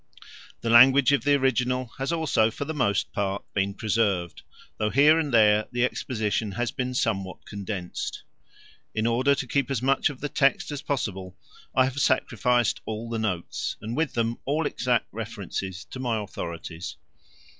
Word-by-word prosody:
The 115 - -2
language 130 +3 +7
of 140 0 +1
the 145 0 +5
original 125 -2 0
has 135 +4 -1
also 155 -9 +2
for 130 +5 -5
the 160 - -4
most 100 -10 0
part 100 0 -2
been 100 0 0
preserved, 105 -6 0 0.4
though 105 - +1
here 150 +6 +5
and 150 -3 -1
there 105 -2 +4
the 120 0 +2
exposition 110 -5 -2
has 120 +4 -1
been 125 -2 -3
somewhat 95 -6 -2
condensed. 100 -3 -5 0.7
In 110 0 0
order 130 +4 +3
to 140 - -3
keep 140 +2 0
as 130 -3 -2
much 135 +3 +3
of 140 -3 -8
the 145 - -2
text 140 0 +1
as 145 -1 -4
possible 95 -10 -3 0.4
I 130 - +6
have 130 +2 -1
sacrificed 125 -3 +2
all 110 +1 -5
the 115 - -1
notes, 95 -6 -3
and 115 +2 -5
with 160 -1 0
them 115 0 0
all 150 +3 0
exact 125 -4 0
references 100 -3 -5
to 130 - -7
my 120 -3 0
authorities. 85 -4 -6
115 Hz, 165 wpm, -26 LUFS, 105-135 Hz, 0.7 s, language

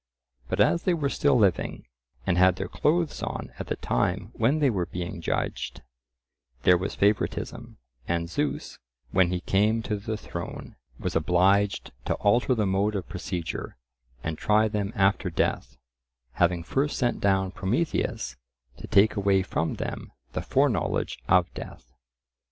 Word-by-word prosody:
But - - -2
as 170 - +4
they 180 -2 +2
were 145 -4 0
still 145 -2 +3
living, 100 -6 +1 0.4
and 90 - +2
had 95 0 +5
their 95 0 -4
clothes 160 - 0
on - - -5
at - - -5
the - - -1
time - - -1
when 120 +7 +2
they 145 -4 +3
were 90 -5 -1
being 85 -1 -5
judged, - - -3 0.8
there 90 - +6
was 90 +2 -2
favouritism, 105 +1 -1 0.3
and 85 -1 0
Zeus, 145 - -3 0.3
when 90 -2 +4
he 90 0 -2
came 105 +5 +2
to 105 - -2
the 110 +2 -4
throne, - - -7 0.2
was - - -3
obliged 95 +5 +2
to - - 0
alter 120 +5 +2
the 110 -2 +1
mode 100 +2 +1
of 95 - -3
procedure, 90 -7 -4 0.5
and 80 -1 -3
try 110 +1 +3
them 105 -2 -2
after 95 -1 +2
death, 65 -5 -1 0.5
having 85 +4 +1
first 140 - 0
sent 120 -3 0
down 95 -1 +2
Prometheus 95 - -1 0.4
to - - -9
take 105 +2 +4
away 100 -2 +3
from 80 -3 -1
them - - -5 0.2
the - - -2
foreknowledge - - +1
of 90 -1 +4
death. - - -10
100 Hz, 150 wpm, -27 LUFS, 90-110 Hz, 0.8 s, there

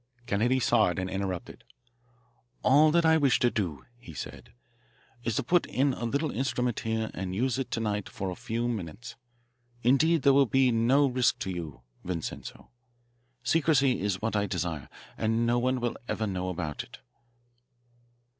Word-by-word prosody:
Kennedy 120 +4 +1
saw 120 -2 +3
it 90 - -3
and 95 0 -3
interrupted. 95 -2 -4 1.0
"All 150 +4 +6
that 170 +1 +3
I 160 0 +5
wish 140 -5 +3
to 120 - +2
do," 80 - -3
he - - -12
said, - - -8 0.7
"is 115 -3 -1
to 140 - 0
put 170 +8 +2
in 135 +1 +1
a 120 - -4
little 140 +5 -1
instrument 125 -3 -1
here 110 -1 -2
and 95 0 -4
use 125 +4 0
it 135 - -3
to - - -2
night 105 -2 -2
for 95 -1 -4
a - - -5
few 115 +5 -3
minutes. 115 +1 -5 0.7
Indeed, 150 +6 +3
there 140 -1 +6
will 140 -1 +5
be 130 +1 +3
no 120 +5 +4
risk 125 -2 +2
to 95 - -2
you, 80 -7 -6 0.2
Vincenzo. 85 -3 -6 0.7
Secrecy 140 -2 +3
is 100 0 -2
what 110 0 -1
I 105 0 +1
desire, 85 -8 -3 0.3
and 115 +1 +1
no 120 +1 +2
one 130 +1 +1
will 120 -1 -2
ever 110 - -1
know 95 -2 -2
about 80 -4 -3
it." - - -14
115 Hz, 170 wpm, -28 LUFS, 95-130 Hz, 1.0 s, All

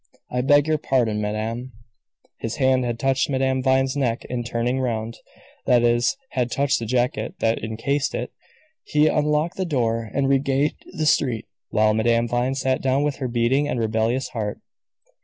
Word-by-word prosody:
I 125 - 0
beg 145 +2 +4
your 155 -1 +1
pardon, 115 -7 +1
madame." 110 +4 -3 0.7
His 115 - -4
hand 130 -2 +2
had 120 -1 -2
touched 135 +3 +1
Madame 130 -1 +1
Vine's 130 0 +2
neck 125 -5 -1
in 125 -1 -3
turning 120 +2 -1
round 115 -2 -2 0.5
that 120 -1 +4
is, 120 - +2
had 125 -2 0
touched 140 +2 +1
the 115 - -5
jacket 125 - -1
that 115 -9 0
encased 135 +6 -1
it. - - -4 0.5
He 150 0 +2
unlocked 150 +3 +1
the 190 - 0
door 115 -7 -1
and 140 0 0
regained 135 +1 +2 0.2
the 155 - 0
street, 120 -6 +2 0.2
while 110 0 +3
Madame 115 +2 +2
Vine 120 +3 0
sat 130 -1 0
down 135 +2 +1
with 145 -2 -1
her 130 - -3
beating 120 +4 +1
and 125 - -2
rebellious 115 +3 0
heart. 105 -3 -4
125 Hz, 170 wpm, -23 LUFS, 115-135 Hz, 0.7 s, beg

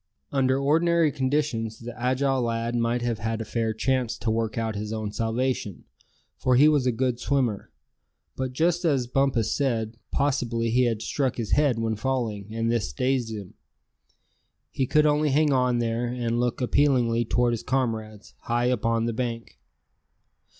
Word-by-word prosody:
Under 130 -1 +2
ordinary 160 +3 +3
conditions 130 -5 -1
the 120 0 -8
agile 130 +2 0
lad 115 0 -1
might 120 +1 0
have 120 -2 -1
had 115 0 -2
a 115 - -4
fair 115 +1 -1
chance 125 +1 -1
to 115 - -1
work 110 -1 -1
out 115 -1 -1
his 105 +1 -4
own 110 -2 -3
salvation, 115 -2 -2 0.6
for 130 - +2
he 140 +4 +7
was 145 -4 +3
a - - +4
good 125 0 -1
swimmer; 125 -7 -1 0.7
but 130 -1 -3
just 170 +6 +1
as 140 -7 +2
Bumpus 125 -3 +1
said, 115 -5 -1
possibly 120 -5 0
he 125 +2 +3
had 115 -2 -1
struck 135 -4 -1
his 115 -3 -4
head 145 -5 +3
when 115 -1 -1
falling, 110 -4 -2
and 115 +1 -1
this 115 -5 -1
dazed 130 -3 0
him. 100 -4 -7 1.2
He 130 - -1
could 150 +3 +3
only 150 0 +3
hang 145 +1 +3
on 125 -2 +2
there, 120 +1 -1
and 120 -1 -2
look 120 +1 -1
appealingly 125 -3 +2
toward 120 +1 +1
his 115 - -3
comrades, 110 -5 -3
high 120 +1 0
up 125 -4 -1
on 115 0 +1
the 115 - -1
bank. 115 -1 -4
120 Hz, 170 wpm, -25 LUFS, 115-135 Hz, 1.2 s, he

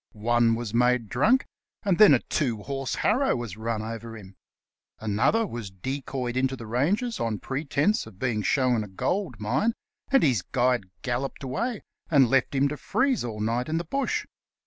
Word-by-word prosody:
One 115 +1 +2
was 115 -2 -5
made 125 -2 +2
drunk, 215 - +3 0.4
and 195 -4 +1
then 210 -10 +9
a 120 - 0
two 115 -8 -1
horse 135 -2 -3
harrow 260 +6 +2
was 120 -5 -5
run 110 0 -3
over 115 0 -6
him; 95 -2 -13 0.6
another 110 - +2
was 115 - -6
decoyed 125 +4 -4
into 130 +1 +1
the 120 - -9
ranges 185 - 0
on 115 -2 -1
pretence 145 - 0
of 95 - -14
being 115 -2 -1
shown 125 +1 +2
a - - -8
gold 155 - -2
mine, 130 - +1 0.4
and 270 - +5
his 125 - +3
guide 125 0 +1 0.2
galloped 130 +3 -3
away 215 - -2 0.3
and 135 -6 +5
left 135 +1 +2
him 135 +1 +3
to 150 - -5
freeze 265 - +1
all 110 -3 -5
night 115 +5 -1
in 160 - 0
the 170 - -1
bush. 275 - -1
125 Hz, 175 wpm, -26 LUFS, 115-150 Hz, 0.6 s, then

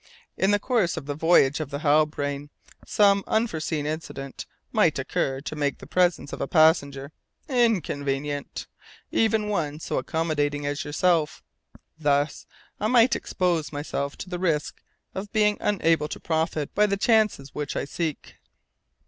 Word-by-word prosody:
In 190 - +1
the 205 - +4
course 210 -5 0
of - - -5
the 145 - -3
voyage 150 -2 +4
of 155 -3 -4
the 140 - -4
Halbrane 145 -1 +1 0.4
some 200 -1 +4
unforeseen 160 -9 -1
incident 150 -3 -5 0.2
might - - +3
occur 135 0 -1
to 155 - -6
make 145 -2 -1
the - - -12
presence 175 -5 +1
of - - -5
a - - -1
passenger 140 -4 +3 0.4
inconvenient 145 - -1 0.5
even 220 -1 +2
one 155 -7 -2
so - - -2
accommodating 145 -3 -1
as 145 0 -2
yourself. 155 +1 +1 0.6
Thus 145 -1 0 0.3
I 215 - 0
might 235 +1 +5
expose 175 -4 -1
myself 145 -1 -4
to 185 - -8
the 175 - -3
risk 160 -5 -1 0.3
of 195 +2 -6
being 210 -1 +2
unable 165 -6 +2
to - - -6
profit 160 -2 -1
by 210 +1 +4
the 200 -1 0
chances 215 - +2
which 150 -1 -4
I - - -1
seek." 155 +1 -4
155 Hz, 150 wpm, -25 LUFS, 145-195 Hz, 0.6 s, might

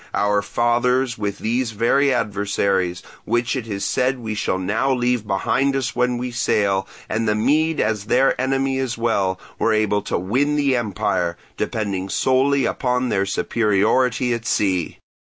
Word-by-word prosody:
Our 105 0 +2
fathers 120 +2 +1
with 100 -1 -2
these 115 +1 -1
very 135 +6 +2
adversaries, 100 -5 0 0.2
which 120 +3 0
it 125 -4 -4
is 100 -2 -3
said 130 +1 +1
we 110 -3 -5
shall 105 -3 -1
now 105 +8 0
leave 125 -3 0
behind 135 +8 +1
us 130 -3 -2
when 125 0 +1
we 125 +1 -4
sail, 100 -4 +1 0.2
and 115 0 -1
the 105 - +2
Mede 150 +8 +1
as 105 -2 0
their 130 +4 +3
enemy 135 0 0
as 130 -3 -2
well, 100 -5 0 0.2
were 115 - +2
able 105 -1 +1
to - - -2
win 130 +11 0
the 140 -3 +2
empire, 90 -6 -1 0.2
depending 100 -3 -3
solely 135 +4 +2
on 125 -1 0
their 100 -2 0
superiority 115 +5 +1
at 115 -1 -4
sea. 95 -5 0
115 Hz, 155 wpm, -21 LUFS, 100-130 Hz, 0.2 s, their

